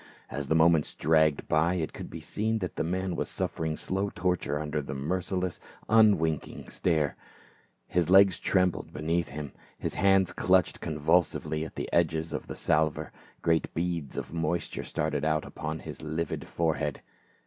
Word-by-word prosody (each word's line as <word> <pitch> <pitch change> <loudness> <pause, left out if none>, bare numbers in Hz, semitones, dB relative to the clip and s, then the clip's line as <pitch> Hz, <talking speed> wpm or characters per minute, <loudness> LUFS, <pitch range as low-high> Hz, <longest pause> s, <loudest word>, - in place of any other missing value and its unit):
As 70 +2 -4
the 80 - +2
moments 80 -1 +4
dragged 80 -1 +3
by 80 +4 +2
it 80 -3 -2
could - - -7
be - - -7
seen 110 +2 -1
that 90 -6 -4
the - - -1
man 90 +2 -1
was - - -2
suffering 80 -1 -2
slow 95 +2 -1
torture 90 -6 -1
under 75 0 -2
the 70 - -6
merciless 90 +5 -2 0.3
un 110 -1 +6
winking 80 -2 -3
stare; 80 -5 +1 0.7
his 85 -2 0
legs 95 -1 +6
trembled 90 -2 +1
beneath 80 +2 -1
him, 75 0 -6 0.3
liis - - -2
hands 95 0 +3
clutched 90 -1 +2
convulsively 80 0 +1
at - - -10
the - - -3
edges 80 -1 +1
of - - -4
the - - -6
salver, 80 0 +1 0.3
great 80 -1 +2
beads 85 -4 -2
of - - -5
moisture 85 0 -2
started 75 - -2
out 80 0 +1
upon 80 +1 -5
his - - -8
livid 80 +1 -3
fore 80 -2 0
head. 75 -3 -3
80 Hz, 165 wpm, -29 LUFS, 75-90 Hz, 0.7 s, un